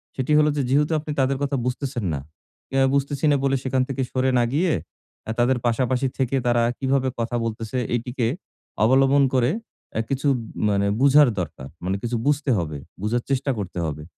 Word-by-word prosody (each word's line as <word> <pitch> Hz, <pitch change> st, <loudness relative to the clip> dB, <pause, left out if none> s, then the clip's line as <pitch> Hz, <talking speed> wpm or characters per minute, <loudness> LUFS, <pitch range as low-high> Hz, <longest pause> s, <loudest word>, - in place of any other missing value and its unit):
সেটি 130 Hz, +3 st, -2 dB
হলো 150 Hz, 0 st, +4 dB
যে 145 Hz, -, +2 dB
যেহেতু 150 Hz, +4 st, +2 dB
আপনি 150 Hz, 0 st, -6 dB
তাদের 135 Hz, 0 st, +2 dB
কথা 140 Hz, 0 st, 0 dB
বুঝতেছেন 125 Hz, -3 st, -2 dB
না। 70 Hz, -, -2 dB, 0.6 s
আ -, -, +4 dB, 0.2 s
বুঝতেছি 140 Hz, +1 st, 0 dB
না -, -, +4 dB
বলে 135 Hz, 0 st, +2 dB
সেখান 130 Hz, 0 st, +1 dB
থেকে 135 Hz, 0 st, -2 dB
সরে 130 Hz, 0 st, +1 dB
না 120 Hz, -, +3 dB
গিয়ে, 170 Hz, +1 st, +2 dB, 0.7 s
তাদের 125 Hz, +2 st, +3 dB
পাশাপাশি 125 Hz, +2 st, +1 dB
থেকে 130 Hz, 0 st, 0 dB
তারা 120 Hz, -1 st, +3 dB, 0.2 s
কিভাবে 135 Hz, 0 st, +1 dB
কথা 115 Hz, +1 st, -2 dB
বলতেছে 115 Hz, +2 st, -4 dB, 0.2 s
এটিকে 120 Hz, 0 st, -1 dB, 0.6 s
অবলম্বন 135 Hz, +4 st, +5 dB
করে 125 Hz, 0 st, +3 dB, 0.4 s
অ্যা 110 Hz, -, 0 dB
কিছু 135 Hz, +1 st, -1 dB, 0.4 s
মানে 100 Hz, 0 st, +1 dB
বুঝার 140 Hz, +1 st, +7 dB
দরকার। 70 Hz, -6 st, -5 dB, 0.2 s
মানে 95 Hz, +2 st, 0 dB
কিছু 120 Hz, 0 st, -1 dB
বুঝতে 145 Hz, -1 st, +2 dB
হবে, 80 Hz, -4 st, -3 dB, 0.2 s
বুঝার 115 Hz, +4 st, 0 dB
চেষ্টা 135 Hz, +1 st, 0 dB
করতে 90 Hz, -3 st, -5 dB
হবে। 75 Hz, -1 st, -4 dB
130 Hz, 175 wpm, -23 LUFS, 115-140 Hz, 0.7 s, বুঝার